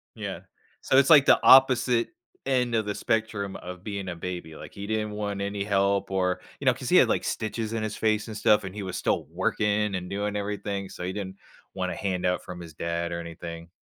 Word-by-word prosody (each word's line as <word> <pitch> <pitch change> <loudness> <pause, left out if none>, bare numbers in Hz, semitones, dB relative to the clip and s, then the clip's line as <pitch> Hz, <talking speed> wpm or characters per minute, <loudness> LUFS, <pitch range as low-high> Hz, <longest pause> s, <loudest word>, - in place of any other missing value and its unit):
Yeah. - - -5 0.4
So, 130 - +2
it's 140 +2 +5
like 145 -4 +8
the - - +6
opposite 125 -3 +6 0.4
end 125 -3 +1
of 110 -2 +1
the 105 - -2
spectrum 105 -3 -1
of 90 +1 -9
being 100 -3 -4
a 85 - -4
baby, 85 -2 -6
like, - - -10
he 100 0 -7
didn't 110 -1 -1
want 105 -1 -3
any 100 0 -2
help, 100 -1 +1
or 90 -1 0 0.2
you - - -7
know, - - +5
‘cause - - -6
he - - +6
had, - - +7
like, - - +1
stitches 110 0 -3
in 110 -1 -2
his 110 -1 -3
face 110 -1 0
and 110 - -7
stuff, 105 0 +4
and 95 0 -7
he 105 - -4
was 95 - -4
still - - 0
working 105 -1 0
and 90 0 -4
doing 105 +1 -2
everything, 100 -1 -3
so 90 - -8
he 90 +1 -3
didn't 95 -1 -6 0.4
want 90 -1 -2
a - - -4
handout 90 -2 -1
from 90 -1 -8
his 85 -3 -10
dad 85 +1 -3
or 85 - -3
anything. 85 0 -8
100 Hz, 225 wpm, -26 LUFS, 90-110 Hz, 0.4 s, like